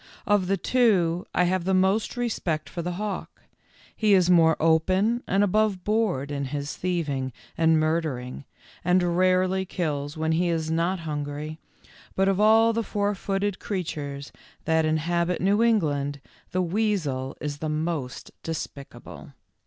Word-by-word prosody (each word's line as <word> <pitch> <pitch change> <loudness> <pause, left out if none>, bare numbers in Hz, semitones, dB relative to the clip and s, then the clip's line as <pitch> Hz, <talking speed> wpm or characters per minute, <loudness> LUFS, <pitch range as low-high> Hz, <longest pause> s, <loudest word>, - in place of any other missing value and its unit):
Of 205 -3 +2
the 195 +1 +1
two, 185 -7 +2
I 180 - +2
have 180 0 +1
the 190 +1 +1
most 190 +5 +1
respect 165 -11 -2
for 170 - -5
the 175 +1 -3
hawk. 205 +1 -5 0.5
He 210 -2 +4
is 180 -1 +4
more 165 -2 +5
open 185 +9 +2
and 195 +2 +2
above 205 -2 +1
board 205 -11 0
in 140 -1 -2
his 145 +1 -4
thieving 150 -8 -2 0.2
and 160 -1 +3
murdering, 155 -5 -2 0.4
and 180 0 +2
rarely 185 +1 +2
kills 150 -5 -3
when 160 0 0
he 170 +2 +1
is 160 -1 -1
not 170 +3 0
hungry, 150 0 -5 0.6
but 195 0 +2
of 195 0 +1
all 225 +2 +5
the 230 - 0
four 205 -1 -1
footed 195 0 -2
creatures 145 -7 -4 0.3
that 160 0 +2
inhabit 170 +3 0
New 200 +4 +2
England, 145 -11 +1 0.3
the 185 0 0
weasel 170 -9 -1
is 145 -1 -4
the 155 - -3
most 155 -4 -3
despicable. 155 -3 -7
175 Hz, 145 wpm, -25 LUFS, 155-195 Hz, 0.6 s, more